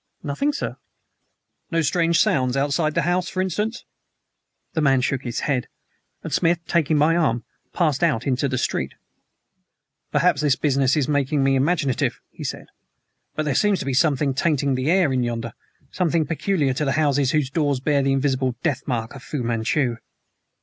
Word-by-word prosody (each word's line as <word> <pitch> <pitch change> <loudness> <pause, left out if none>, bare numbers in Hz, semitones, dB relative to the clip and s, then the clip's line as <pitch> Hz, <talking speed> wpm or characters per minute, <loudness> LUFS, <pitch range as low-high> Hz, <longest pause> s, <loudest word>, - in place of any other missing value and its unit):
"Nothing, 165 - 0
sir." 290 - -4 0.9
"No 165 -1 +1
strange 170 +1 +2
sounds 130 -2 +2
outside 145 +3 0
the 170 - +2
house, 175 +2 0
for 185 - -5
instance?" 210 +5 -2 0.9
The 160 - 0
man 135 -3 +3
shook 130 0 -1
his 120 -3 -4
head, 135 -4 -1 0.6
and - - -5
Smith, 170 +1 +3
taking 160 -2 +1
my 155 +3 +4
arm, 130 -9 +1 0.3
passed 155 -5 0
out 140 -8 +1
into 135 0 +1
the 130 -1 -2
street. 70 - -2 1.2
"Perhaps 170 -5 +2
this 145 -4 +3
business 135 -1 +1
is 140 -3 +1
making 145 -1 +1
me 135 0 +3
imaginative," 140 -1 +1
he - - -9
said; - - -5 0.7
"but 155 - -1
there 150 - 0
seems 205 +7 +2
to - - -5
be 135 - -1
something 140 -1 +2
tainting 140 -1 +1
the 130 +3 -1
air 175 -6 +3
in 130 - +1
yonder 115 -2 -3 0.4
something 165 -3 +1
peculiar 155 -2 0
to 135 +1 -1
houses 145 -3 +2
whose 145 -2 0
doors 145 -3 0
bear 140 +1 +1
the 135 0 +1
invisible 130 -2 0
death 145 -7 0
mark 115 -4 -2
of 135 - -10
Fu 135 -1 -4
Manchu." 120 +2 0
145 Hz, 170 wpm, -22 LUFS, 130-165 Hz, 1.2 s, my